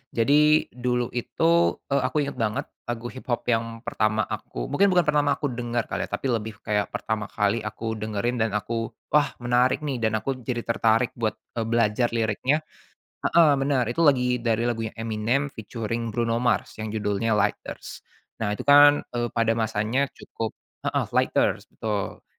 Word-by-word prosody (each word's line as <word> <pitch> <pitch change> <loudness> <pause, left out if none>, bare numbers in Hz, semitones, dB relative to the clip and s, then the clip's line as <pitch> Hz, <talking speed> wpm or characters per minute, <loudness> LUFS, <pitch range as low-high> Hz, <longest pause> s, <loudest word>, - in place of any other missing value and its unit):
Jadi, 150 +6 +4
dulu 125 -1 -1
itu, 165 +8 +2 0.2
eee, 140 - +3
aku 130 +3 0
inget 140 -3 -5
banget, 110 -2 0 0.2
lagu 120 0 -4
hiphop 125 -2 -3
yang 115 0 -1
pertama 110 0 +1
aku - - -5
mungkin 200 +1 +4
bukan 175 - +5
pertama 145 -1 +2
aku 145 -4 -2
denger 120 -1 -2
kali - - -2
ya, - - -30
tapi 135 - -3
lebih 110 -1 -2
kayak 105 -1 0
pertama 110 -1 -2
kali 105 +2 0
aku 110 +1 -4
dengerin 110 +3 -2
dan 110 -1 0
aku, 115 +2 -2 0.2
"Wah 150 0 +3
menarik 125 +4 +2
nih." 140 -4 -2
dan 110 -1 +1
aku 130 +4 -2
jadi 120 -1 -3
tertarik 115 +1 +2
buat, 110 -2 0 0.2
eee, 110 - -1
belajar 115 +1 +2
liriknya. 120 +7 +1 0.6
Heeh 160 -4 +5
benar, 135 -3 +2
itu 170 - 0
lagi 125 -5 +3
dari 115 0 +1
lagunya 115 -2 -1
Eminem 115 +5 -1
featuring 115 +1 -4
Bruno 115 +1 0
Mars 120 - +1
yang 110 - -4
judulnya 105 +1 0
Lighters. 105 0 -3 0.4
Nah, 105 -1 -1
itu - - -6
kan, 145 +1 +7
eee, 120 -1 -1
pada 115 -1 +1
masanya 110 +4 0
cukup 115 -1 -6 0.3
heeh, - - 0
Lighters, - - +1
betul. 105 -3 -4
115 Hz, 165 wpm, -25 LUFS, 110-130 Hz, 0.6 s, kan